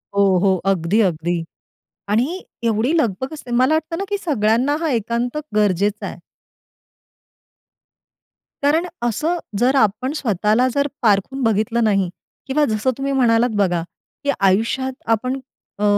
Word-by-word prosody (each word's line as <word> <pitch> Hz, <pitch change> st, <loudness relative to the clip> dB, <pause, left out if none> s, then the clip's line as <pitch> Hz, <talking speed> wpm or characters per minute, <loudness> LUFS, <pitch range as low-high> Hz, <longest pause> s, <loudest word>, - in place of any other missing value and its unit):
हो, 200 Hz, -, +4 dB, 0.2 s
हो, 190 Hz, -1 st, +4 dB, 0.2 s
अगदी, 185 Hz, +3 st, +1 dB
अगदी. 170 Hz, -2 st, 0 dB, 0.7 s
आणि 260 Hz, -, 0 dB, 0.2 s
एवढी 230 Hz, +6 st, +1 dB
लगबग 260 Hz, -, -1 dB
असते 290 Hz, -5 st, -9 dB
मला 255 Hz, +5 st, +3 dB
वाटतं 315 Hz, +1 st, -1 dB
ना, 390 Hz, -, -2 dB
की 405 Hz, -, 0 dB
सगळ्यांना 260 Hz, -, +1 dB
हा 325 Hz, -, 0 dB
एकांत 235 Hz, +3 st, -1 dB, 0.2 s
गरजेचा 205 Hz, 0 st, +1 dB
आहे. -, -, -8 dB, 2.4 s
कारण 320 Hz, +5 st, +2 dB, 0.2 s
असं, 305 Hz, +9 st, 0 dB, 0.2 s
जर 255 Hz, +3 st, +3 dB
आपण 225 Hz, +2 st, +2 dB
स्वतःला 220 Hz, -, +1 dB
जर 280 Hz, +1 st, +1 dB
पारखून 220 Hz, +5 st, +1 dB
बघितलं 225 Hz, +1 st, +1 dB
नाही 195 Hz, -4 st, +2 dB, 0.4 s
किंवा 290 Hz, +3 st, +2 dB
जसं 215 Hz, +1 st, 0 dB
तुम्ही 275 Hz, 0 st, -2 dB
म्हणालात 240 Hz, -2 st, +3 dB
बघा, 180 Hz, -5 st, +1 dB, 0.4 s
की 285 Hz, -, +2 dB
आयुष्यात 225 Hz, +7 st, +1 dB, 0.2 s
आपण 255 Hz, +4 st, 0 dB, 0.4 s
अ, -, -, -2 dB
235 Hz, 130 wpm, -20 LUFS, 205-270 Hz, 2.4 s, हो